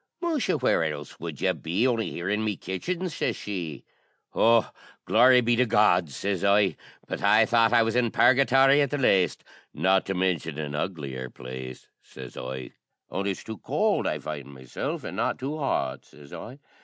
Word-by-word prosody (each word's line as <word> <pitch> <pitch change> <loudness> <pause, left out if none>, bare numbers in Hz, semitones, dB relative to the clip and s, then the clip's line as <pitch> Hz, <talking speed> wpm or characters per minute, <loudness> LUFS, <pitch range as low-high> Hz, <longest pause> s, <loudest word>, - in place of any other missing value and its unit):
"Musha! 305 - 0
where 125 - +2
else 75 -2 -5
would - - -6
ye - - +3
be 95 +10 -1
on'y 115 -3 0
here 85 - -5
in 105 +2 0
my 105 -2 -1
kitchen?" 170 - -4
shashee. 90 - -4 0.5
"O, 115 0 +4 0.4
glory 125 +2 +6
be 120 0 +2
to 125 +1 +2
God!" 105 -6 +3
sez 95 +6 -3
I, 100 -4 +3 0.3
"but - - -5
I - - +5
thought 115 -1 +3
I 120 -1 +5
was 115 0 -1
in 125 -1 +2
Purgathory 135 +3 +4
at 140 - +1
the 145 - -2
laste, 95 -9 +2 0.3
not 95 0 +2
to 95 - -2
mintion 85 -5 -1
an 75 -2 -4
uglier 70 -6 -4
place," 65 0 -9
sez 65 -2 -11
I, 65 0 -6 0.4
"only 100 +1 -2
it's 95 - -4
too 110 -3 -8
cowld - - 0
I - - -1
find 75 -2 -7
meself, 65 -1 -5
an' - - -6
not - - 0
too 145 +4 -4
hot," 70 - -1
sez 70 -1 -16
I. 125 +4 -8
100 Hz, 180 wpm, -26 LUFS, 75-120 Hz, 0.5 s, glory